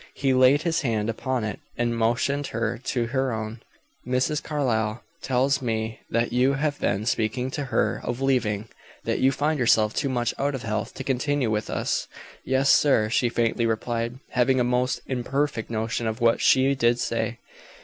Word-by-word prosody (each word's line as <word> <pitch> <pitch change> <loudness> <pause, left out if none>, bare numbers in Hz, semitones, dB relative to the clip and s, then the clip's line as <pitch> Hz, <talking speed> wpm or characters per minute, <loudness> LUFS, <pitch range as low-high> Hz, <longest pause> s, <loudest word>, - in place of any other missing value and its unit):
He 135 -1 +1
laid 130 +4 +5
his 165 -2 0
hand 115 -5 0
upon 130 +1 -2
it, 105 - -4 0.2
and 120 -1 0
motioned 125 +5 0
her 115 +1 -2
to 120 -3 0
her 130 +2 -1
own. 110 0 -5 0.4
"Mrs. 130 +4 0
Carlyle 120 -7 -1 0.2
tells 135 +2 +1
me 110 -2 -2
that 115 +1 0
you 130 +3 +3
have 145 +1 -1
been 100 +2 0
speaking 120 +3 -1
to 145 0 -3
her 130 - 0
of 120 +1 -3
leaving 115 -6 0 0.4
that - - -1
you 135 - +4
find 145 +3 0
yourself 110 -3 +3
too 140 - -1
much 120 -2 0
out 140 0 0
of 130 - -6
health 110 -1 -3
to 135 - -5
continue 135 -1 0
with 105 0 -1
us." - - -1 0.4
"Yes, 130 +1 +2
sir," 115 -7 +4
she 120 0 +2
faintly 115 0 +1
replied, 115 +2 -2
having 130 +1 +2
a - - +3
most 125 +1 0
imperfect 130 -1 -2
notion 115 +1 -2
of 110 +2 -3
what 115 -1 +3
she 135 +1 +4
did 120 -3 +2
say. 115 0 -2
125 Hz, 180 wpm, -25 LUFS, 115-135 Hz, 0.4 s, laid